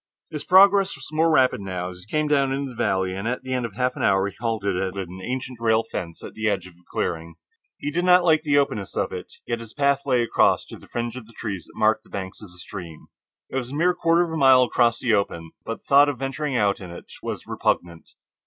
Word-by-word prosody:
His 150 -2 -5
progress 195 +2 +5
was - - -9
more 160 +1 +3
rapid 130 -8 +3
now, 90 -2 -4
as 90 - -12
he - - -19
came 155 0 +1
down 140 -2 +2
into 135 0 -2
the - - -12
valley, 95 -4 0
and 100 +4 -4
at 125 +2 -2
the 130 0 -4
end 125 -2 -1
of 105 - -16
half 125 +1 0
an - - -6
hour 95 0 +3
he 100 - -8
halted 110 -4 -1
at 95 +1 -2
an 95 -1 -6
ancient 125 0 -4
rail 110 -1 +3
fence 85 -2 -6
on - - -7
the 110 0 0
edge 95 -3 -1
of 95 - -13
a 90 +1 -26
clearing. 85 -1 -3 0.4
He 145 - -4
did 175 +3 0
not 180 0 +6
like 160 -3 +4
the 145 -2 +2
openness 105 -9 -1
of - - 0
it, - - -7
yet 115 - -2
his 115 -1 -11
path 140 -1 +2
lay 125 -3 +3
across 115 - +2
to - - -11
the - - -16
fringe 120 0 -3
of 120 -4 -9
trees 100 -7 -5
that - - -19
marked 110 +1 +2
the - - -22
banks 95 -1 -6
of 105 - -11
the 90 - -18
stream. 90 -4 -9 0.4
It - - -2
was 125 -1 -3
a - - -5
mere 175 +4 +3
quarter 170 0 +3
of 170 - -4
a 160 - -2
mile 130 -3 +6
across 120 -2 +2
that 120 -3 +2
open, 85 -5 -1
but 115 - -5
the - - -48
thought 145 +1 +6
of 140 - -3
venturing 135 +1 -2
out 100 -3 +2
in 95 - -9
it 85 - -10 0.2
was - - -5
repugnant. 85 -2 -2
120 Hz, 260 wpm, -24 LUFS, 95-140 Hz, 0.4 s, not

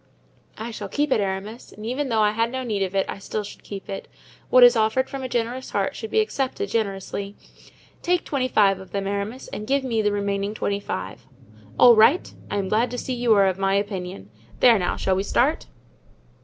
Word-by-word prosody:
"I 225 +2 -5
shall 205 -3 -6
keep 290 +4 -1
it, 220 - +3
Aramis, 200 +4 -4
and 210 - -10
even 260 +4 -2
though 225 -2 +2
I 210 - +3
had 230 +2 0
no 260 0 -3
need 215 -5 -2
of 190 0 -2
it 195 - +2
I - - -6
still 210 +2 -4
should 205 - -11
keep 200 -2 -8
it. 195 - -6 0.4
What 255 0 +7
is 245 0 +8
offered 220 +4 +2
from 275 -1 -5
a 260 - -4
generous 240 +2 -2
heart - - -1
should 445 - -6
be 440 - +3
accepted 410 0 -2
generously. 200 -2 -3 0.7
Take 355 0 +1
twenty 265 -3 -1
five 200 -5 +3
of 190 - -12
them, 200 -1 -2
Aramis, 200 +6 -4
and 215 - -6
give 275 +1 +1
me 230 -4 0
the 210 -1 +1
remaining 200 0 -2
twenty 200 -1 -1
five." 95 - -6 0.5
"All 240 -1 +8
right; 235 +11 +4 0.2
I 205 - -2
am 195 -1 -1
glad 225 +5 +1
to 245 - -5
see 255 - -3
you 240 -1 0
are 200 -1 +5
of 190 0 0
my 195 0 +2
opinion. 185 - -4 0.3
There 235 -4 +6
now, 180 - -1
shall 190 - +1
we 190 - 0
start?" 60 - +1
215 Hz, 220 wpm, -23 LUFS, 195-250 Hz, 0.7 s, is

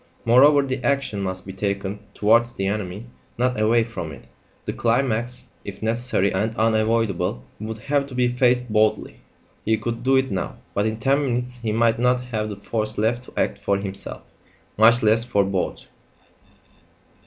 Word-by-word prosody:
Moreover, 140 +5 +6
the 130 -1 -3
action 140 -7 0
must 95 -1 -4
be 95 - -7
taken 100 +1 -3 0.2
towards 115 +3 +3
the 95 - -3
enemy, 100 +1 -3 0.3
not 125 -1 0
away 115 +2 +3
from 110 -9 -6
it; 70 - -12 0.4
the - - -3
climax, 120 0 0 0.2
if 100 +1 -8
necessary 115 -3 +1
and 110 +4 -1
unavoidable, 110 -4 +1 0.2
would 110 +1 -5
have 140 +5 0
to 130 - -9
be 125 0 +3
faced 125 -1 +1
boldly. 110 0 +1 0.5
He 110 +1 +2
could 115 +2 -4
do 135 +2 +3
it 130 0 +2
now; 95 - -3 0.2
but 105 +2 +1
in 110 0 -2
ten 135 +5 +2
minutes 125 -1 -2
he 115 -2 -2
might 115 +1 +2
not 125 +1 +3
have 110 -4 -3
the 105 - -5
force 110 +2 -3
left 115 +3 +1
to - - -15
act 100 - 0
for 100 0 0
himself, 100 0 -6 0.5
much 115 +2 +5
less 110 +1 +4
for 110 -5 +1
both! 95 -1 -2
110 Hz, 170 wpm, -23 LUFS, 105-125 Hz, 0.5 s, Moreover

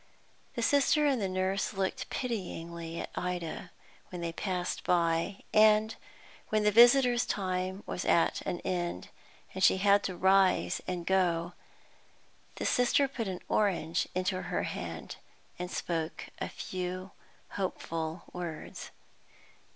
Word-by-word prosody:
The 235 - -1
Sister 285 +4 +4
and 270 -5 +2
the 195 - 0
nurse 185 +2 -1
looked 195 +7 -2
pityingly 170 -8 -4
at - - -7
Ida 180 -3 -4 0.4
when 180 - -6
they 170 -1 -3
passed 180 0 -2
by, 170 +2 +1
and, 215 0 +5 0.5
when 215 0 +2
the 210 - +4
visitors' 240 +2 +6
time 185 0 -2
was - - -4
at 165 - +2
an 175 - -3
end, 175 - -3 0.4
and 190 - -3
she - - +6
had 200 +1 +4
to 185 -2 -3
rise 190 - +3
and 180 -2 -3
go, 175 -2 +1 1.0
the - - -4
Sister 250 +3 +3
put 240 -5 -4
an 185 -2 -4
orange 180 -6 +1
into 185 0 0
her - - -2
hand, - - -5 0.4
and 180 0 -3
spoke 165 -2 -3
a - - -3
few 185 0 -5 0.4
hopeful 165 -3 -3
words. 175 -3 -6
185 Hz, 130 wpm, -30 LUFS, 175-210 Hz, 1.0 s, visitors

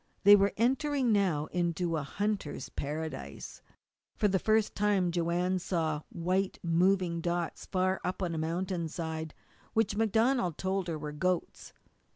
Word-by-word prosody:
They 205 +1 +10
were 200 0 +3
entering 265 +2 +2
now 185 -8 +2
into 170 -1 0
a 155 - -1
hunter's 200 +3 -3
paradise. 145 - -5 0.5
For 210 - +2
the 190 -1 +2
first 220 +1 +2
time 200 -4 +2
Joanne 175 +2 0
saw 160 -4 -1
white, 185 +3 -1
moving 175 0 +2
dots 170 0 -2
far 185 0 0
up 185 +1 -2
on 170 -2 -1
a 160 - -2
mountain 170 +1 -2
side, 160 -1 -5 0.4
which 225 -3 +1
MacDonald 225 - +2
told 190 -1 -1
her 165 -2 -2
were 150 0 -5
goats. 180 +3 -2
180 Hz, 145 wpm, -30 LUFS, 165-200 Hz, 0.5 s, They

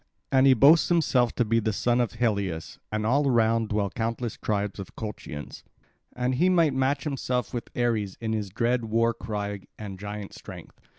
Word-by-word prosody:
And 130 0 +5
he 130 - +7
boasts 145 +8 +6
himself 135 -8 +2
to 120 - +2
be 115 +1 +2
the 110 0 0
son 120 +4 +1
of 120 - -1
Helios; 100 -8 -2
and 110 0 -1
all 140 +5 +2
round 115 -2 +2
dwell 105 -2 0
countless 115 0 -3
tribes 105 -1 -2
of 95 - -8
Colchians; 100 -9 -7 0.5
and 125 +1 0
he 175 +9 +3
might 165 -6 +3
match 135 +1 0
himself 130 -4 -2
with 120 - -4
Ares 110 -5 0
in 110 -1 -2
his 105 -3 -2
dread 120 +4 0
war 115 +1 +2
cry 105 -2 -4 0.2
and 100 -3 -7
giant 105 0 -6
strength. - - -11
115 Hz, 180 wpm, -26 LUFS, 105-125 Hz, 0.5 s, he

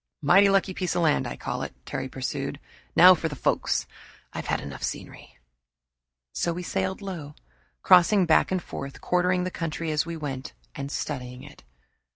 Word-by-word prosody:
"Mighty 195 +7 +6
lucky 195 -1 +2
piece 180 -1 -2
of 175 - +1
land, 155 -2 +2
I - - -6
call - - -4
it," - - -6
Terry 130 0 -4
pursued. 135 +2 -4 0.4
"Now 180 +2 +9
for 165 -2 -2
the 145 - -6
folks - - 0 0.5
I've - - -5
had - - 0
enough 70 - -8
scenery." - - -6 1.0
So 170 - -1
we 180 +2 -5
sailed 190 +2 -2
low, 160 -7 -6 0.5
crossing 185 +2 +6
back 160 +2 +3
and 185 -2 0
forth, 140 0 -7
quartering 180 0 +1
the 185 - -3
country 165 -1 -3
as 150 -1 +1
we 170 0 -6
went, 135 -4 -5 0.2
and 140 +1 -6
studying 125 -4 -5
it. 145 - -14
165 Hz, 175 wpm, -26 LUFS, 140-180 Hz, 1.0 s, Now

